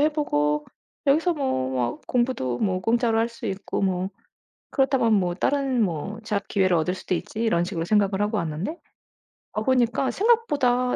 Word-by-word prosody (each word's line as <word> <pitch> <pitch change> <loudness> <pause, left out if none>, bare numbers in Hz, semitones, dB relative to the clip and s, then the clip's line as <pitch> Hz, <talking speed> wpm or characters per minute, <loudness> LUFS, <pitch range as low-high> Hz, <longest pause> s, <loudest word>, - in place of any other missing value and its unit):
해 300 +1 +4
보고 150 - 0 0.4
여기서 320 +5 +3
뭐 260 - -1
뭐 125 -2 -1
"공부도 240 - 0
뭐 185 -3 0
공짜로 230 +2 +2
할 225 +1 +2
수 235 - -12
있고 195 +1 -3
뭐 185 -1 0 0.6
그렇다면 260 -5 +2
뭐 180 -3 +1
다른 270 +1 +1
뭐 195 +4 -2
재학 205 -1 -2
기회를 185 -3 +2
얻을 170 +3 0
수도 185 - -3
있지." 215 - -6
이런 175 -7 +2
식으로 175 -3 -3
생각을 200 -1 +2
하고 210 +2 0
왔는데 170 - -3 0.8
와 215 - -1
보니까 250 +1 +2
생각보다 285 - +2
215 Hz, 330 characters per minute, -24 LUFS, 180-260 Hz, 0.8 s, 해